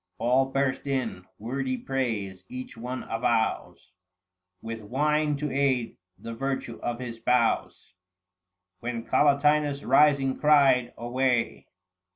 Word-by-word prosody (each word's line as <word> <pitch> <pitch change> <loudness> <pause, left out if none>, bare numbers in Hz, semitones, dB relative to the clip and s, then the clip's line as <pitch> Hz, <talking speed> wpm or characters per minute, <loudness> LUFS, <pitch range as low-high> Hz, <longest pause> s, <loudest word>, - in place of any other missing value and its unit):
" 90 - -53
All 130 +5 +2
burst 135 0 -1
in 120 -9 -2
wordy 130 +3 -3
praise; 110 -10 -3
each 130 0 -7
one 125 +3 -5
avows, 115 -1 -1 0.7
785 - - -32
With 115 -2 -7
wine 150 +2 +1
to 150 0 -3
aid, 130 -4 0 0.2
the 115 - -7
virtue 130 -1 -4
of 120 -1 -2
his 120 -2 -6
spouse. 115 -3 0 0.9
When 115 0 -4
Collatinus 145 +1 +2
rising 140 -3 +4
cried, 135 -5 +4
" - - -39
Away 120 0 -1
130 Hz, 125 wpm, -27 LUFS, 115-140 Hz, 0.9 s, rising